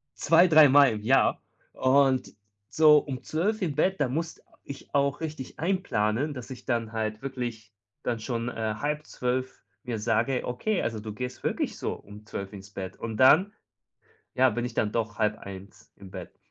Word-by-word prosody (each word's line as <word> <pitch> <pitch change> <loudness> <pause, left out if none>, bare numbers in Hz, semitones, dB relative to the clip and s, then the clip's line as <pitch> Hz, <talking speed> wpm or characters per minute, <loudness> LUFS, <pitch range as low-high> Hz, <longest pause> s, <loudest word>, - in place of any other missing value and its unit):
2, 170 +3 +5
3 155 -3 +7
Mal 140 -1 +6
im 105 - -5
Jahr 130 +4 +3 0.3
und 130 0 +2 0.4
so 150 -1 +6
um 130 -4 -6
0:00 200 +7 -1
im 155 -6 -1
Bett, 190 +4 +1
da 140 - +2
musst 160 +5 -4 0.2
ich 140 +1 -10
auch 140 -1 +1
richtig 155 -5 -7
einplanen, 150 - 0
dass 125 0 -8
ich 125 -1 -9
dann 115 -3 -1
halt 110 -1 -3
wirklich 120 -5 -6 0.3
dann 115 -2 -2
schon, 115 0 -3
äh, 110 -2 -3
11:30 130 -3 -3 0.2
mir 120 -3 -4
sage: 120 +4 0
„Okay, 185 - -1
also, 110 -2 -2
du 110 0 -6
gehst 125 +3 -6
wirklich - - -2
so - - -2
um 105 +1 -13
0:00 100 -1 -6
ins 100 +1 -11
Bett” 95 -1 -6
und 115 -2 -5
dann 160 +10 +6 0.8
ja, 130 0 +5
bin 120 +2 -3
ich 125 - -4
dann 105 - 0
doch 110 -2 -2
0:30 100 -2 -4
im 95 -2 -13
Bett. - - -9
125 Hz, 175 wpm, -27 LUFS, 110-145 Hz, 0.8 s, 3